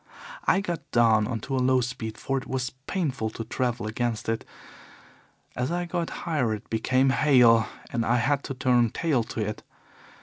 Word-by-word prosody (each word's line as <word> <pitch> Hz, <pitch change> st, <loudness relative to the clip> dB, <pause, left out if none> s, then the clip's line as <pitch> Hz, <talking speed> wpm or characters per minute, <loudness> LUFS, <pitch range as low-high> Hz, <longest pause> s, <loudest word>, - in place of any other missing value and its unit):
I 195 Hz, -, +3 dB
got 175 Hz, -4 st, -5 dB
down 110 Hz, -3 st, +4 dB
on 115 Hz, -3 st, -3 dB
to 135 Hz, -, -3 dB
a 130 Hz, -, +1 dB
low 130 Hz, 0 st, +4 dB
speed, 120 Hz, -3 st, -4 dB
for 135 Hz, -, -2 dB
it -, -, -11 dB
was 130 Hz, -1 st, -2 dB, 0.2 s
painful 140 Hz, -, -1 dB
to 115 Hz, -, -6 dB
travel 120 Hz, 0 st, -2 dB
against 115 Hz, +1 st, -2 dB
it. 115 Hz, 0 st, -1 dB, 1.1 s
As 125 Hz, +5 st, -1 dB
I 175 Hz, 0 st, -1 dB
got 170 Hz, -1 st, -2 dB, 0.2 s
higher 135 Hz, -10 st, +1 dB
it 105 Hz, -, -11 dB
became 130 Hz, +4 st, +2 dB
hail, 125 Hz, -6 st, +5 dB, 0.3 s
and 120 Hz, -1 st, +1 dB
I 120 Hz, +2 st, +2 dB
had 140 Hz, +4 st, +1 dB
to 135 Hz, -, -4 dB
turn 125 Hz, -2 st, +3 dB
tail 145 Hz, -2 st, 0 dB
to 115 Hz, -, -4 dB
it. 105 Hz, -, -5 dB
125 Hz, 180 wpm, -26 LUFS, 115-135 Hz, 1.1 s, hail